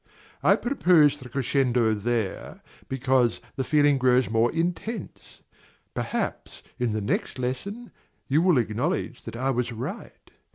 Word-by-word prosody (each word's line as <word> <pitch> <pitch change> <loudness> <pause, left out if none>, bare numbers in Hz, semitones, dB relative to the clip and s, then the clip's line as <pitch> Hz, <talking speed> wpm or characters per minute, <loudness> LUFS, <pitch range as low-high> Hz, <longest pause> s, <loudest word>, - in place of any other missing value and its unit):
I - - +5
proposed 165 - +3
the 125 - -10
crescendo 125 -3 +1
there, 110 -1 -3 0.3
because 130 -2 +1 0.2
the 135 - -1
feeling 145 0 +3
grows 125 -2 +3
more 115 +1 +3
intense; 175 +5 -4 0.5
perhaps, - - -4 0.2
in 120 -3 0
the 110 - -1
next 100 - -2
lesson, 195 - -4 0.4
you 145 +4 +3
will 175 -4 +4
acknowledge 125 - -1
that - - -7
I 130 +3 0
was 125 -1 -1
right. 130 - -7
130 Hz, 130 wpm, -26 LUFS, 120-155 Hz, 0.5 s, I